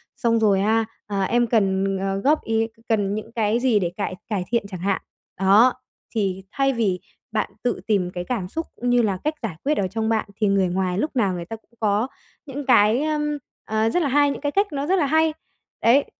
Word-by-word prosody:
Xong 230 -2 +2
rồi, 200 -3 +3
a, 220 +2 +2 0.2
ờ 200 -1 -1
"Em 240 +3 +2
cần, 195 -3 +1
ờ, 195 0 -1
góp 290 +10 +2
ý, 225 0 +1 0.2
cần 205 -3 +1
những 215 +2 -6
cái 225 0 +1
gì 245 -4 +3
để 175 -3 -1
cải 200 -2 -2
cải 200 -5 -1
thiện?" 235 -3 +1
chẳng 185 -3 -7
hạn. 195 +2 0 0.4
Đó, 205 +6 +6 0.4
thì 190 -3 -1
thay 275 -1 +1
vì 200 -6 0 0.3
bạn 220 - -1
tự 245 -1 0
tìm 190 -4 +1
cái 175 -1 -4
cảm 200 -4 -3
xúc 325 - -4
cũng 245 - -2
như 245 0 +4
là 200 -4 0
cách 305 +1 0
giải 195 -8 -3
quyết 300 +2 +1
ở 190 - +1
trong 220 +3 -2
bạn 220 -2 0
thì 215 -2 +1
người 195 -1 +3
ngoài 185 0 -1
lúc 300 +5 -2
nào 200 -7 +2
người 170 -1 -5
ta 225 - -6
cũng 225 - -20
có 215 +2 +1 0.4
những 280 0 -6
cái, 235 0 +5
ưm, 295 -1 -1 0.3
ờ, 220 +1 +1
rất 355 - +1
là 300 - +1
hay, 285 +1 +4
những - - -6
cái 290 -1 -1
cách 400 +6 +2
nó 280 0 -2
rất 380 - +3
là 295 - +2
hay. 315 +2 +3 0.5
Đấy, 260 +5 +5
220 Hz, 230 wpm, -23 LUFS, 195-260 Hz, 0.5 s, Đó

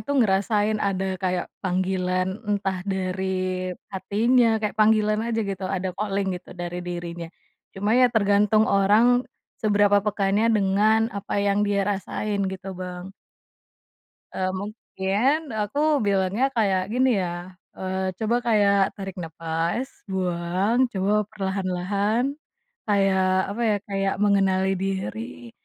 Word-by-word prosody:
itu 285 0 -2
ngerasain 210 -1 +2
ada 190 -1 -1
kayak, 180 -1 -2
panggilan 185 +1 -1
entah 195 -2 -1
dari 185 -1 -2 0.2
hatinya, 225 +5 +2
kayak 210 -1 -2
panggilan 215 0 +3
aja, 225 -1 -1
gitu. 195 -1 -4
Ada 185 -1 -2
calling 195 0 -2
gitu 180 - -14
dari 175 0 -4
dirinya. 175 -1 -6 0.5
Cuma 205 +3 0
ya, 250 +1 +5
tergantung 210 -1 +3
orang, 220 +6 +3 0.3
seberapa 205 -2 +4
peka 200 -1 0
nya 215 +3 +3
dengan 215 +2 +2
apa 200 0 -4
yang 200 0 +2
dia 200 -1 +1
rasain, 205 +1 -2
gitu 190 0 -6
Bang. 180 0 -7 1.2
Eee, 185 0 -1
mungkin, 220 +7 -1
aku 210 +7 -3 0.3
bilangnya 195 +4 +1
kayak 195 -4 +2
gini, 255 +2 +3
ya. 180 - -2 0.5
Eee, 190 0 -2
coba 225 +1 +1
kayak, 205 -3 +4 0.2
tarik 195 -2 -6
nafas, 165 +8 -2 0.2
buang, 185 +6 +1
coba 195 +1 0 0.2
perlahan-lahan. 195 +3 -1 0.6
Kayak, 195 -2 +3 0.3
apa 235 - -3
ya, 210 - +2
kayak 195 0 0
mengenali 195 -1 +2
diri 120 - -4
195 Hz, 120 wpm, -24 LUFS, 185-215 Hz, 1.2 s, ya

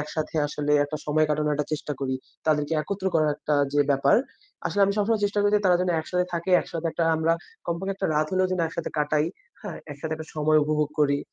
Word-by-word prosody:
একসাথে 150 +2 -4
আসলে 150 0 -2
একটা 145 +1 -4
সময় 155 +1 +3
কাটানোর 150 0 +1
একটা 145 0 -2
চেষ্টা 150 0 -2
করি। 130 -1 -1 0.3
তাদেরকে 150 0 +1
একত্র 195 +3 -4
করার 155 -2 +3
একটা 150 0 -1 0.2
যে 145 - +3
ব্যাপার 140 0 +4 0.5
আসলে 205 - -1
আমি 200 - +1
সবসময় 210 +1 +1
চেষ্টা 205 +1 0
করি 205 - +3
যে - - +1
তারা 180 -1 +5
যেন 180 0 +1
একসাথে 180 +3 -1
থাকে। 170 +2 -2
একসাথে 165 0 -5
একটা 170 - 0
আমরা 160 +1 +2 0.3
কমপক্ষে 185 +3 -2
একটা 195 0 -2
রাত 155 +1 +2
হলেও 185 0 +3
যেন 185 - 0
একসাথে 165 0 -4
কাটাই, 150 +1 +2 0.4
হ্যাঁ? 205 -5 -6
একসাথে 145 +2 -5
একটা 160 0 -8
সময় 155 0 +4
উপভোগ 150 0 +1
করি। 140 -1 +3
155 Hz, 210 wpm, -25 LUFS, 150-180 Hz, 0.5 s, তারা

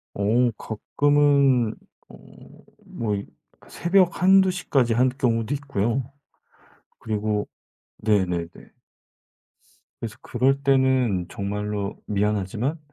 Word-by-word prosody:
어 115 +4 +2
가끔은 140 0 +2 0.4
어 - - -13 0.7
뭐 105 -3 -3
이 100 - -5 0.3
그 - - -20
새벽 180 0 +2
1-2 190 0 +5
시까지 135 -10 0
할 125 +3 +3
경우도 120 -1 -1
있고요. 135 -2 -2 0.9
그리고 105 -1 -2 0.5
네네네. 90 -5 0 1.5
그래서 110 -3 -6
그럴 135 +2 0
때는 130 -9 +2
정말로 100 0 -4
"미안하지만 105 - -1
120 Hz, 190 characters per minute, -24 LUFS, 105-140 Hz, 1.5 s, 1-2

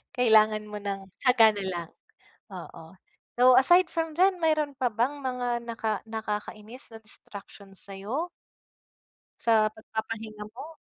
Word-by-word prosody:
Kailangan 220 -3 +4
mo 210 - -5
ng 195 -1 -5
tiyaga 250 -4 +6
na - - -2
lang, 175 -3 -4 0.6
oo. - - -9 0.5
So, 250 0 +7
aside 350 +8 +6
from 325 -1 -2
diyan 370 0 +4
mayro'n 310 -3 +1
pa 255 -2 0
bang 250 +7 -1
mga 245 -2 -2
naka 225 -2 -3 0.2
nakakainis 220 +2 -5
na 225 - -10
distraction 200 -2 -12
sayo? 200 - -5 1.1
Sa 220 -2 +4
pagpapahinga 220 -1 -6
mo? 315 +6 -9
225 Hz, 125 wpm, -27 LUFS, 215-260 Hz, 1.1 s, So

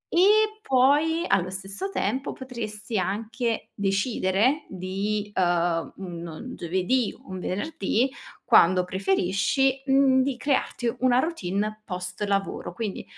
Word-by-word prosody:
E 430 +4 +4
poi, 295 +4 +3
allo 185 -1 +2
stesso 195 - -5
tempo, 270 -7 -2
potresti 220 -4 -5
anche 225 +5 -2
decidere 200 +6 +1
di, 200 +3 -3
uhm, 175 -2 +1
un 175 +5 -7
giovedì 190 +8 0
o - - -14
un 185 - -5
venerdì, 225 - -1 0.3
quando 180 +1 +5
preferisci, 195 +8 +1
mhmm, 270 -1 +5
di 265 -1 -1
crearti 255 -3 -1
una 250 -1 +3
routine 215 - -1
post 180 0 -6
lavoro, 195 -3 -2
quindi, 210 0 -4
210 Hz, 115 wpm, -25 LUFS, 185-260 Hz, 0.3 s, quando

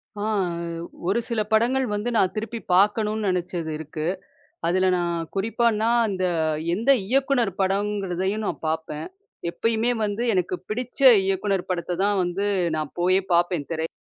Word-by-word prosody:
ஆ. 205 - -6 0.9
ஒரு 210 +5 +2
சில 225 -2 0
படங்கள் 250 +4 +3
வந்து 210 +4 -2
நான் 185 - +2
திருப்பிப் 225 -2 -5
பாக்கணும்னு 210 +2 +2
நெனச்சது 175 -3 -2
இருக்கு. 155 0 -5 0.6
அதுல 185 +2 +2
நான் 175 -1 -1 0.2
குறிப்பான்னா, 225 +2 +1 0.2
அந்த 185 -2 -2 0.5
எந்த 230 +8 +1 0.2
இயக்குநர் 260 -3 +2
படம்ங்கறதையும் 195 +1 -1
நா - - 0 0.2
பாப்பேன். 160 -1 -3 0.4
எப்பயுமே 230 +6 0
வந்து 210 +3 -2
எனக்குப் 185 -1 -1
பிடிச்ச 250 +5 -4 0.3
இயக்குநர் 195 -1 0
படத்த 175 -1 -2
தான் 205 -1 +2
வந்து 180 +3 -1 0.3
நான் 155 -2 -3
போய்ப் 185 +2 +2
பாப்பேன், 170 -2 +2
திரை 160 -1 -1
195 Hz, 135 wpm, -24 LUFS, 175-220 Hz, 0.9 s, படங்கள்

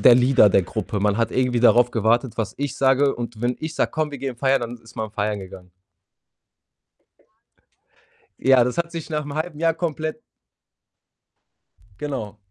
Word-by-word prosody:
der 125 - +8
Leader 125 -3 +5
der 95 - +4
Gruppe. 105 +2 -4
Man 105 0 +1
hat 115 -1 0
irgendwie 125 -2 +1
darauf 120 0 +5
gewartet, 115 +2 +1
was 110 -2 -3
ich 145 -1 -3
sage 135 +1 +3
und 115 -2 -7
wenn 120 +1 0
ich 155 0 -5
sage: - - 0
„Komm, 155 -2 -2
wir 140 - -7
gehen 130 -2 -4
feiern“, 135 +1 +2
dann 120 +1 -5
ist 115 +1 -18
man 110 -1 -4
feiern 105 -1 -2
gegangen. 90 -1 -12 2.7
Ja, 130 -2 +5
das 125 +4 -2
hat 170 0 -1
sich 165 -1 -6
nach 150 -1 -2
'nem 145 0 -7
halben 155 -1 -4
Jahr 165 -1 +2
komplett 155 -2 -3 1.8
Genau. 130 -8 -5
125 Hz, 170 wpm, -22 LUFS, 115-145 Hz, 2.7 s, der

